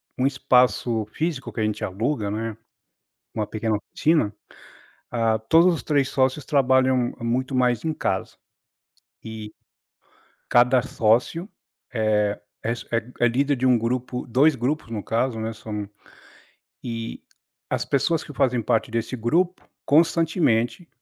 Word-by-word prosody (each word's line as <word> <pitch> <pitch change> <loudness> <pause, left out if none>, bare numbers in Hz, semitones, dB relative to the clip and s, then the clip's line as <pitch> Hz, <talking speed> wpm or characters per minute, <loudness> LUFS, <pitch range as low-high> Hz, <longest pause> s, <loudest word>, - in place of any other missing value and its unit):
um 130 - +2
espaço 125 -4 +2
físico 155 -3 -3
que - - -6
a - - +1
gente 105 -1 -2
aluga, 105 +3 -1
né, 110 +1 -3 0.8
uma 105 -1 -2
pequena 110 0 -1
oficina. 110 0 0 0.8
Ah, 115 -2 +1
todos 165 +11 +4
os 165 - -3
3 140 -3 +1
sócios 130 +2 +1
trabalham 130 -3 +2
muito 130 +3 -1
mais 125 -1 +1
em 160 - 0
casa. 95 -10 -2 0.9
E 110 -1 -7 1.0
cada 125 +1 +5
sócio 125 - +1 0.5
é 105 -2 +1 0.2
é 115 - 0
s 120 - -4
é 115 - +2 0.2
é 120 - +5
líder 140 +4 +1
de 130 +1 +1
um 125 -1 +5
grupo, 125 +2 -2
2 135 +5 +3
grupos, 130 +2 -2
no 110 -3 -4
caso, 115 +1 -1
né, 110 +1 -3
são 105 -2 -6 0.9
e 115 -1 -5 0.5
as - - 0
pessoas 155 +4 +1
que 150 - -10
fazem 125 -3 +1
parte 110 +1 0
desse 115 +2 -2
grupo, 170 +11 +1 0.2
constantemente 165 -3 +2
125 Hz, 135 wpm, -24 LUFS, 110-140 Hz, 1.0 s, cada